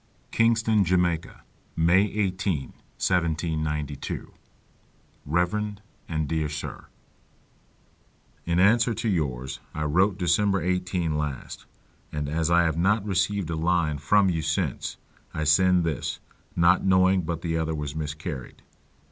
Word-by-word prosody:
Kingston, 115 -2 +3
Jamaica, 90 -2 0 0.3
May 85 +4 +4
18, 95 -7 -1 0.3
1792. 80 -4 -2 0.9
Rev. 90 +7 0 0.3
and 80 -2 -1
Dear 80 -1 -1
Sir, 75 0 -6 1.6
In 85 +1 +1
answer 115 +4 +4
to 115 +2 -3
yours 65 - -2 0.2
I 75 - -2
wrote 90 +6 +2
December 95 +2 +2
18 90 -3 -1
last, 75 -4 -5 0.4
and 75 -1 -3
as 80 +2 0
I 85 0 +5
have 80 -1 0
not 100 +3 +2
received 95 -2 0
a - - -1
line 80 -2 +1
from 100 +7 +3
you 80 -2 -1
since, - - -2 0.4
I 80 - -1
send 90 +3 +4
this, 80 -5 -2 0.4
not 85 +2 +4
knowing 95 0 +4
but 85 0 -4
the 80 -1 -1
other 80 0 -1
was 75 -1 -4
miscarried. 75 -2 -6
85 Hz, 120 wpm, -26 LUFS, 80-95 Hz, 1.6 s, I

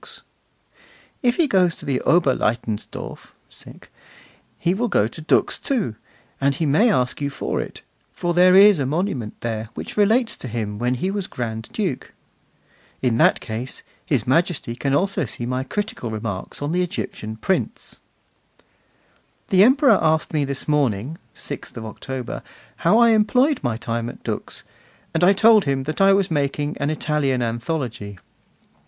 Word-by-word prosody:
'If 245 -1 +2
he 335 - +4
goes 185 -7 +3
to - - -11
Oberlaitensdorf 130 -6 -1 1.2
he 175 - +1
will 240 +5 0
go 105 - +2
to 135 - -9
Dux, 155 - +1
too; 220 - -1 0.5
and 140 0 +2
he 160 - -1
may 185 - +4
ask 125 -5 0
you 140 - 0
for 140 - -3
it, - - -8 0.3
for 175 -1 -2
there 180 +1 +6
is 200 -2 +7
a 135 - 0
monument 150 - -2
there 110 -2 -3
which - - -7
relates 225 +4 +3
to - - -7
him 105 -3 -4
when 125 +1 0
he 185 +10 -2
was 200 -1 -3
Grand 110 -2 -5
Duke.' 185 - -3 0.9
'In 120 -2 +1
that - - +4
case, 115 +3 -6 0.2
His 130 -8 0
Majesty 150 -3 0
can 135 +2 0
also 195 -1 0
see 120 +1 -6
my 125 +1 -2
critical 205 - -4
remarks 110 +2 -5
on 145 - -2
the 180 +1 +1
Egyptian 165 - -4
prints.' 185 +12 -3 1.5
The 190 0 +6
Emperor 270 +5 +5
asked 160 0 +1
me 150 -2 +1
this 140 -1 -4
morning, 145 -1 0 0.2
6th - - -8
October, 120 +3 -6 0.4
how 215 - +3
I 235 0 +6
employed 250 +7 +3
my 120 -4 -1
time 115 0 -3
at - - -12
Dux, - - -5 0.5
and 165 - +1
I 190 +3 +7
told 215 +1 +5
him 135 -1 0
that 155 +6 -3
I 195 0 +6
was 195 -2 +2
making 145 0 -1
an 140 - 0
Italian 150 -5 0
anthology. 115 - -4
145 Hz, 155 wpm, -22 LUFS, 120-190 Hz, 1.5 s, is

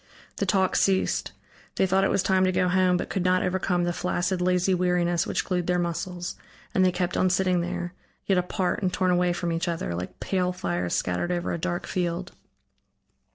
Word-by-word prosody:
The - - -1
talk 190 -2 +2
ceased. 190 -1 +1 0.4
They - - +3
thought 190 +1 +2
it - - +3
was 195 - +1
time 190 -1 +3
to 185 - +2
go 180 0 +1
home, 180 0 +3
but - - -4
could 190 - -1
not 185 0 +3
overcome 180 -1 0
the 175 0 0
flaccid 180 +1 -1
lazy 180 +1 +2
weariness 175 -1 +1
which - - -1
glued 180 -2 -1
their 180 0 +2
muscles, 175 +1 -3 0.4
and 185 - +3
they 185 - +4
kept 180 0 -2
on 185 - +3
sitting 185 -1 +2
there, 175 0 -4 0.3
yet 190 -2 +3
apart 180 +2 -1
and 185 -2 +1
torn 185 0 +1
away 180 0 +2
from 175 0 -2
each 165 +1 -1
other, 165 - -2
like 90 +1 -6
pale 180 -1 0
fires 90 - -2
scattered 90 - -1
over 175 -1 -1
a 170 - -3
dark 175 +1 -2
field. 175 0 -2
180 Hz, 200 wpm, -26 LUFS, 175-185 Hz, 0.4 s, they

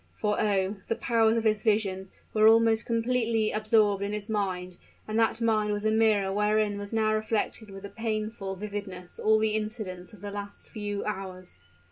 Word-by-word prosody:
For, 210 0 0
oh! 200 -1 +1
the 230 - 0
powers 225 -1 +2
of 225 - 0
his 215 -2 +2
vision 200 -4 0 0.2
were 215 0 +5
almost 225 0 +4
completely 230 -2 +1
absorbed 215 -2 +2
in 200 +1 -2
his 210 +1 -3
mind; 185 -4 -2 0.3
and 215 +1 0
that 225 0 +2
mind 215 -2 +1
was 205 +1 -3
a 215 - +3
mirror 215 -3 +3
wherein 210 0 +1
was 205 0 -6
now 220 -1 +2
reflected 215 0 -2
with 195 0 -9
a - - -7
painful 215 -3 -3
vividness 195 -3 -7
all 220 0 +4
the 220 0 +1
incidents 210 -5 -4
of 210 - -15
the 205 0 -6
last 200 0 -8
few 205 -1 -4
hours. 185 - -6
215 Hz, 180 wpm, -28 LUFS, 200-220 Hz, 0.3 s, were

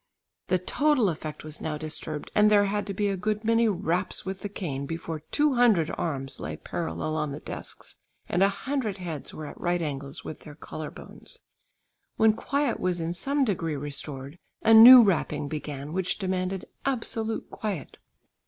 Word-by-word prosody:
The 185 - +3
total 260 +4 +2
effect 155 -2 -5
was 155 0 -8
now 150 -1 -2
disturbed, 155 -1 -5
and 210 0 +5
there 205 -1 +5
had 205 +1 -1
to 200 - -3
be 205 +1 +1
a 200 - 0
good 210 +3 -2
many 230 +1 +3
raps 180 -2 -1
with 190 0 -4
the 205 - -5
cane 140 -9 -4
before 165 0 -4
two 295 -1 +2
hundred 225 -10 +4
arms 135 -5 -3
lay 75 +1 -5
parallel 85 - -3
on 150 -2 -1
the 140 - -5
desks - - -7 0.3
and 180 - 0
a 195 - +6
hundred 220 0 -2
heads 165 -6 -6
were 155 - -7
at - - -10
right 175 0 +1
angles 140 -4 -5
with 155 - -6
their 150 - -12
collar 155 0 -7
bones. - - -10 0.7
When 220 -1 +5
quiet 280 +3 -1
was 180 -1 0
in 165 +1 -2
some 275 +9 +1
degree 165 -8 -1
restored 140 +1 -6 0.2
a 225 - +6
new 240 +2 +12
rapping 155 -7 0
began 145 -1 -5
which 185 0 0
demanded 185 -1 -2 0.2
absolute 225 -4 -2
quiet. 205 -8 -5
180 Hz, 175 wpm, -27 LUFS, 155-215 Hz, 0.7 s, new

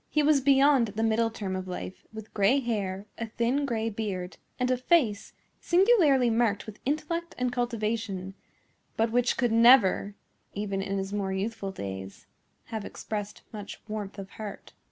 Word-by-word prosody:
He 300 - +2
was 290 -2 +4
beyond 275 -2 +5
the 220 - 0
middle 225 +1 +2
term 200 -4 -4
of 185 0 -4
life, 180 0 -7
with 220 -1 -10
gray 205 +7 +4
hair, 205 -6 -2
a 230 - -3
thin, 240 +6 0
gray 225 -3 -1
beard, 195 -4 -4 0.2
and 250 0 +1
a - - +4
face 250 - +2 0.3
singularly 345 - +4
marked 225 -3 +1
with 215 -1 -10
intellect 335 +4 -2
and 250 0 0
cultivation, 220 -5 -2 0.6
but 225 0 +2
which 245 +1 +2
could 245 -3 +1
never, 230 -4 +5 0.4
even 200 -1 -2
in 195 0 -2
his 195 +1 -3
more 200 -2 -1
youthful 200 0 -3
days, 95 - -7 0.5
have 220 -2 -2
expressed 210 0 -6
much 205 -2 -7
warmth 210 -2 -5
of 195 -1 -6
heart. 215 -2 -8
220 Hz, 160 wpm, -28 LUFS, 200-250 Hz, 0.6 s, beyond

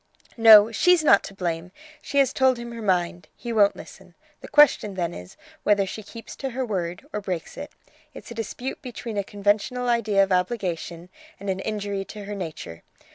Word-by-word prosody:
"No, 225 -1 +8
she's 360 +7 +3
not 200 -9 +6
to 195 - -10
blame! 175 -1 -3 0.3
She 280 - -4
has 270 -2 +3
told 260 -1 +3
him 235 0 -7
her 230 -1 -7
mind; 175 -3 -1
he 235 -1 -6
won't 205 -2 +4
listen. - - -13 0.2
The - - -11
question 265 -9 +4
then 175 -2 -2
is, 90 +1 -11 0.2
whether 205 -1 +2
she 205 +3 -7
keeps 225 +2 -11
to 270 - -4
her 260 +1 -3
word, 180 -5 -4
or 210 - -3
breaks 180 -4 -5
it. 290 - -8 0.4
It's 270 - -12
a - - -5
dispute 235 +3 -5
between 240 -3 -7
a - - -1
conventional 205 +5 -1
idea 215 -4 +3
of 195 - -3
obligation 180 -3 -2 0.3
and 200 0 -3
an 190 - -4
injury 205 -1 -3
to 210 0 -9
her 205 - -6
nature. 160 - -7
205 Hz, 190 wpm, -24 LUFS, 185-235 Hz, 0.4 s, No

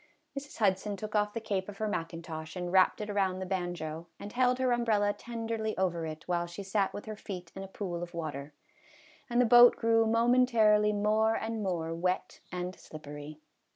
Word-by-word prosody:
Mrs. 280 +1 -7
Hudson 200 -1 +1
took 210 +2 -6
off 210 -1 +1
the 230 - -2
cape 205 -3 -2
of 200 - -9
her 215 - -1
mackintosh 165 -3 -5
and 180 -1 -3
wrapped 190 +2 +4
it 210 - -4
around 190 -2 +1
the 190 - -4
banjo, 175 -3 -4
and 205 - -8
held 250 0 +3
her 260 -1 +1
umbrella 215 -4 +2
tenderly 225 -2 -4
over 175 -3 0
it 155 0 -8
while 175 -1 0
she 175 +4 -7
sat 195 0 0
with 205 - -7
her 215 -1 -5
feet 180 -5 -8
in 195 - -6
a 195 - -6
pool 185 -3 -5
of 175 0 -7
water, 150 -3 -5 0.8
and 240 0 +1
the 250 - +5
boat 240 +1 +8
grew 225 -1 +3
momentarily 230 -2 +4
more 215 +2 +2
and 225 0 -3
more 170 -4 -2
wet 180 +2 -2
and 180 +1 -4
slippery. 150 0 -9
200 Hz, 190 wpm, -30 LUFS, 175-220 Hz, 0.8 s, boat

